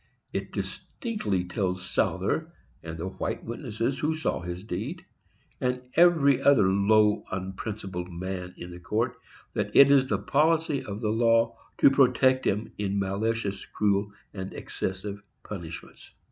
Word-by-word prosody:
It - - -3
distinctly 210 - -3
tells 90 0 -2
Souther, - - 0 0.3
and 80 0 -7
the 85 +3 -4
white 95 - -4
witnesses 120 +1 -3
who 155 +1 0
saw 155 - -1
his 90 +1 -6
deed, 120 - -5 0.5
and 125 -1 -1
every 160 -6 +5
other 135 -9 +5
low, 105 +2 +4
unprincipled 95 -1 -5
man 90 +1 -5
in 90 - -8
the 90 - -9
court, 110 +7 -1 0.4
that - - -2
it 140 0 +9
is 135 -2 +5
the 105 - +1
policy 150 +6 +2
of 100 +2 -6
the 105 -2 0
law 115 0 +3 0.2
to - - +6
protect 130 -1 +4
him 105 +3 -1
in 100 -1 -1
malicious, 100 +1 -1
cruel 100 -1 0 0.2
and 95 -1 -6
excessive 100 +2 -4 0.2
punishments. 85 -5 -8
105 Hz, 140 wpm, -27 LUFS, 95-130 Hz, 0.5 s, it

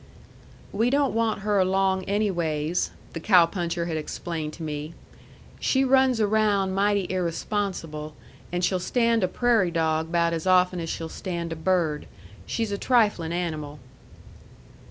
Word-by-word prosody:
"We 225 +4 +2
don't 280 +1 +2
want 225 -2 0
her 205 0 +1
along 190 0 +1
anyways," 175 -6 0 0.2
the 165 - -4
cow 180 0 +6
puncher 170 -1 -3
had 165 -2 -2
explained 155 0 -4
to 165 - -8
me. 150 +1 -5 0.6
"She 265 0 +2
runs 260 -2 +3
around 205 -2 +2
mighty 200 0 +1
irresponsible, 170 -4 -3 0.4
and 175 0 0
she'll 185 0 0
stand 230 +2 +1
a - - +3
prairie 225 -2 +2
dog 160 -1 0
'bout 170 -1 +2
as 165 +2 -3
often 180 -1 +4
as 165 -1 -4
she'll 165 - -4
stand 170 -1 -4
a - - -6
bird. 160 -2 0 0.4
She's 225 -3 -2
a 200 - -2
triflin' 210 -10 +2
animal." 155 -4 -3
180 Hz, 145 wpm, -25 LUFS, 165-205 Hz, 0.6 s, cow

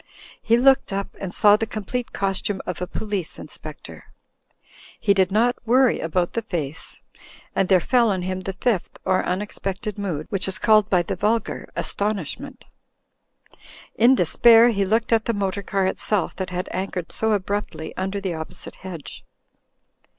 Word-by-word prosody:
He 230 0 +3
looked 265 -2 +4
up 195 0 -3
and 190 -2 -4
saw 205 +2 +6
the 225 - -2
complete 225 +3 -4
costume 195 0 -1
of 180 -1 -5
a 180 - -2
Police 200 -5 -4
Inspec - - -9
tor. - - -11 0.9
He 205 -3 +3
did 190 -1 +2
not 235 +4 +2
worry 250 +2 +4
about 175 +2 -1
the 230 - -1
face. 165 -8 -5 0.5
And 190 - +1
there 190 -2 +6
fell 235 +4 +3
on 190 -3 -1
him 185 0 -2
the 190 +1 -5
Fifth, 195 -1 -1
or 185 0 +2
Unexpected 200 +2 -3
Mood, 170 -7 -3
which 195 -2 0
is 190 - -3
called 215 -2 +4
by 180 -2 +3
the - - -3
vulgar 220 +2 -1
Astonishment. 200 -6 -3 1.3
In 240 +4 +5
despair 230 +5 +6
he 200 -4 +1
looked 225 +4 +1
at 225 -1 +2
the 230 - 0
motor 200 0 -1
car 195 -1 0
itself 190 0 0
that 185 -1 -3
had 180 0 -3
anchored 185 -2 -4
so 220 0 +1
abruptly 200 -5 -3
under 195 +2 -2
the 190 -3 -3
opposite 160 -1 -7
hedge. 180 -5 -8
195 Hz, 165 wpm, -23 LUFS, 185-220 Hz, 1.3 s, saw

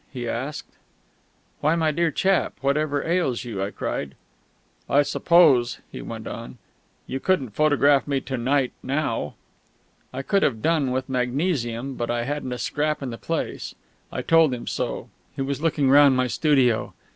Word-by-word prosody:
he 125 -3 -5
asked. 130 +6 -4 0.9
"Why, 155 +3 +2
my 160 -2 +2
dear 170 +2 +1
chap, 190 +5 +1
whatever 145 +1 0
ails 165 -8 0
you?" 110 -6 -5
I 100 - -1
cried. 70 -8 -4 0.7
"I 145 +1 +4
suppose," 140 -7 +4
he - - -7
went 115 -1 -7
on, 115 +2 -7 0.5
"you 135 - -4
couldn't 140 - 0
photograph 145 +2 +3
me 140 -1 +1
to 135 - -4
night 130 +2 +1
now?" 130 - -2 0.8
I 135 +1 -5
could 200 +5 +2
have 115 -10 0
done, 160 -5 +2
with 130 +1 -2
magnesium, 130 -1 -1
but 120 - -3
I 120 0 0
hadn't 140 0 -3
a 125 - -3
scrap 150 +3 -1
in 130 - -4
the 115 - -7
place. 165 -1 -4 0.4
I - - -4
told 165 -5 +4
him 120 - -8
so. - - -3 0.3
He 135 - -2
was 140 +1 -3
looking 150 -4 +1
round 140 -2 +7
my 130 - +2
studio. 125 -2 +2
135 Hz, 165 wpm, -24 LUFS, 125-150 Hz, 0.9 s, round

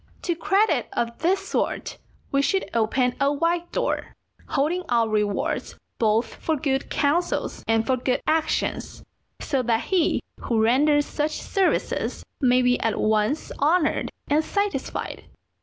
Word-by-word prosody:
To 345 - +1
credit 390 +6 +2
of 235 0 -1
this 365 +4 +1
sort - - -2 0.3
we 275 - +3
should 380 +7 0
open 245 +3 +2
a 280 0 +4
wide 335 +4 0
door, - - -2 0.3
holding 315 +6 0
out 230 -2 +2
rewards 210 -2 -1 0.2
both 220 +1 +3
for 320 - -1
good 270 -1 -1
counsels 320 +5 0
and 225 0 +2
for 260 +1 +1
good 250 +1 0
actions, 315 0 -1 0.4
so 270 -3 0
that 230 -2 +1
he 365 -4 +1 0.2
who 230 -2 0
renders 290 +5 +4
such 300 +1 -2
services 390 -3 -1 0.2
may 255 -1 +4
be 250 0 +3
at 225 -2 0
once 215 +7 +1
honoured 310 +2 +2 0.2
and 300 +2 +2
satisfied. 405 +4 -3
280 Hz, 140 wpm, -24 LUFS, 235-325 Hz, 0.4 s, a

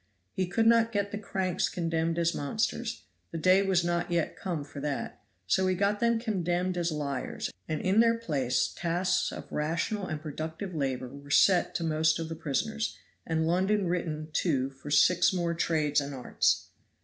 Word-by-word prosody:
He 185 -1 -1
could 225 +5 +1
not 230 0 +5
get 200 -2 -1
the 205 - -4
cranks 190 -3 -1
condemned 165 -1 -1
as 170 0 +2
monsters 225 +8 -2 0.3
the - - -5
day 185 +4 +5
was 190 -3 +2
not 175 0 0
yet 170 -2 0
come 170 -6 -3
for 145 0 -9
that; 145 -1 -4 0.2
so 190 - +2
he 185 - +2
got 200 +2 +1
them 235 0 +3
condemned 185 -5 -1
as 175 -1 0
liars, 140 -4 -3 0.2
and 155 - -1
in 190 +4 +3
their 230 0 +5
place 135 - 0
tasks 180 +2 0
of - - -9
rational 170 +6 -1
and 155 -2 -3
productive 160 +5 -5
labor 130 -4 -2
were 140 +2 -12
set 180 +5 +4
to 170 - -1
most 155 0 +2
of 165 -1 -4
the 165 - -4
prisoners, 215 +9 -2 0.3
and 160 -1 +1
London 190 +4 +2
written 160 -3 -2
to 135 -6 +1
for 135 +2 -11
six 180 +4 +5
more 170 -2 0
trades 155 -3 +1
and 140 0 -5
arts. 125 - +1
170 Hz, 180 wpm, -29 LUFS, 155-190 Hz, 0.3 s, not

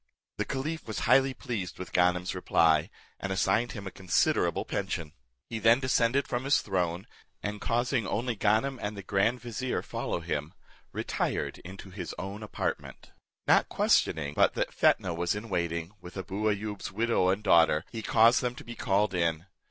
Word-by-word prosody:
The - - -1
caliph 150 +3 -4
was 110 - -4
highly 130 +2 +4
pleased 110 -9 -4
with 90 - -8
Ganem's 90 0 +2
reply, 80 -4 +3 0.3
and 100 - -4
assigned 100 +5 +1
him 105 -3 -7
a 95 - -5
considerable 95 -3 +1
pension. 80 -3 -3 0.3
He 115 - -4
then 115 +3 +5
descended 130 0 +2
from 120 0 -2
his 140 - +3
throne, 90 -2 -1 0.4
and 105 0 -4
causing 120 -1 0
only 120 +2 -1
Ganem 110 +6 +1
and 105 0 -4
the 100 - -7
grand 100 +6 +1
vizier, 125 +1 -3
follow - - -3
him, 75 -2 -4 0.4
retired - - -2
into 95 +2 -10
his 90 -2 -6
own 100 +3 -6
apartment. 105 - -4 0.3
Not - - +4
questioning 75 -3 +2
but - - +3
that - - -1
Fetnah 90 - +2
was 85 +3 -1
in 110 +2 -6
waiting, 85 -1 -2
with 90 +2 -10
Abou 100 +3 -1
Ayoub's 105 -1 -3
widow 110 -3 +2
and 100 +3 0
daughter, 80 -2 +4
he 115 - -5
caused 115 +2 +5
them 125 -1 -2
to - - -10
be 120 - -8
called 100 -2 +1
in. 85 -2 0
100 Hz, 170 wpm, -29 LUFS, 90-115 Hz, 0.4 s, then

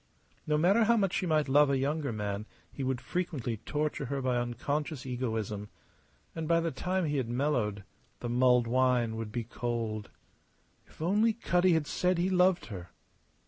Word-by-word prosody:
No 150 0 +2
matter 195 +8 +4
how 235 +1 +4
much 195 -4 +1
she 185 - 0
might 155 -2 +2
love 145 +2 +5
a 140 - +2
younger 140 +1 -1
man 105 -1 -3 0.2
he 140 - -5
would 130 -1 -1
frequently 140 -11 -3
torture 150 +4 -2
her 140 +2 -2
by 130 -2 0
unconscious 135 +4 -2
egoism; 110 -5 -3 0.6
and 160 -1 -4
by 165 0 +4
the 165 -1 -1
time 180 +6 -1
he 145 -1 -1
had 125 -4 -1
mellowed, 120 -6 0 0.4
the - - -4
mulled 125 0 +4
wine 125 -2 +2
would 110 -1 -5
be 120 +1 -2
cold. 115 -2 -3 0.8
If - - -9
only 210 +6 +3
Cutty 180 -5 +2
had 160 -2 +1
said 180 +4 +1
he 180 +2 +1
loved 180 0 +3
her! 90 -6 -8
135 Hz, 175 wpm, -30 LUFS, 120-165 Hz, 0.8 s, love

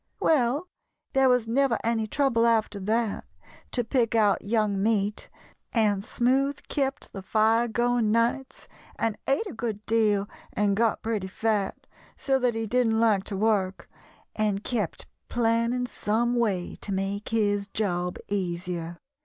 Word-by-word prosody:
] - - -47
"Well, 290 +2 +2 0.5
there 270 -1 +4
was 250 -3 +2
never 250 0 +2
any 225 -1 0
trouble 235 -2 +2
after 220 -3 +1
that 220 +2 -1 0.5
to 245 - 0
pick 230 -1 +1
out 210 -3 +3
young 210 -2 0
meat, 210 -1 0 0.4
and 210 -4 +2
Smoothe 265 +5 +1
kept 275 0 -2
the 195 - -6
fire 220 +4 +2
going 240 0 +1
nights 235 +4 0 0.3
and 225 -2 0
ate 275 +11 +1
a 395 - -6
good 220 -3 -4
deal 210 -3 +2 0.3
and 205 -1 +1
got 225 +1 +1
pretty 215 -4 -2
fat, 210 +1 -1 0.3
so 270 -1 +1
that 245 -2 +1
he 225 0 -2
didn't 225 0 +2
like 215 -4 +3
to 200 - -4
work, 195 -3 0 0.5
and 210 -2 0
kept 215 -9 -2 0.2
planning 235 +1 +1
some 240 +1 0
way 205 -7 -1
to 205 - -5
make 195 +2 -2
his 205 -3 +1
job 180 -4 -2
easier. 175 -3 -3
225 Hz, 145 wpm, -26 LUFS, 205-240 Hz, 0.5 s, there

